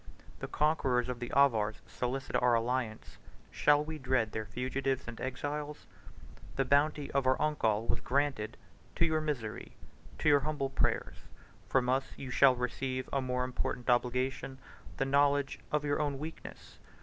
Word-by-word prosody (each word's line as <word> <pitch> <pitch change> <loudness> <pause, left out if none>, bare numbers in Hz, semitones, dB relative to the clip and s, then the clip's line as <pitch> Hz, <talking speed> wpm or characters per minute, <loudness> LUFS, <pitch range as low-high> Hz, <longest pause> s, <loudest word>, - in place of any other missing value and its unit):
The - - -4
conquerors 135 -5 +1
of 125 -1 -3
the 120 - -5
Avars 110 -7 +3
solicit 130 +2 -3
our 125 -1 +4
alliance; 115 -1 -2 0.3
shall 145 0 +4
we 155 0 -6
dread 125 -4 +1
their 110 -1 -4
fugitives 130 +4 -2
and 120 -1 -7
exiles? 145 +3 -4 0.5
5 - - -18
The 135 - +1
bounty 145 +2 +2
of 135 -1 +1
our 130 - +3
uncle 115 -8 +1
was - - 0
granted 135 -4 -1 0.4
to 170 - +3
your 160 -1 +1
misery, 125 -9 -4 0.4
to - - -1
your 145 -1 +7
humble 140 -2 -2
prayers. - - 0 0.5
From 130 -2 +2
us 130 +1 0
you 135 -2 -6
shall 130 0 +6
receive 130 +1 -3
a 140 - +2
more 125 -1 -1
important 125 0 -1
obligation, 125 +2 0 0.4
the 135 - +1
knowledge 140 0 +2
of 150 -1 0
your 145 +1 +1
own 145 -2 -1
weakness. 155 +3 -9
135 Hz, 160 wpm, -32 LUFS, 125-145 Hz, 0.5 s, your